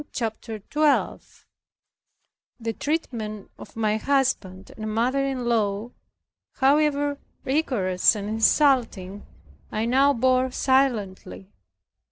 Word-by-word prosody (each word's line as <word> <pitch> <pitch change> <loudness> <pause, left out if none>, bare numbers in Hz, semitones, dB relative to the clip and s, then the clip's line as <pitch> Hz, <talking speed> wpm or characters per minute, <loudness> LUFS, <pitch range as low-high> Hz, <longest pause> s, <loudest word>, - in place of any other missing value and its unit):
CHAPTER 225 -1 -4
12 295 +8 -1 1.1
The 225 -1 -3
treatment 225 -9 -4
of - - -12
my 215 -1 0
husband 230 -8 -1
and 215 0 -5
mother 255 +4 +1
in 265 -3 -2
law, 220 -1 0 0.6
however 285 +1 +2 0.3
rigorous 235 -10 +2
and 205 -1 -5
insulting, 220 -4 +1 0.4
I 215 +1 -1
now 270 +4 +4
bore 255 +1 +2
silently. 235 -8 -1
235 Hz, 95 wpm, -24 LUFS, 215-275 Hz, 1.1 s, now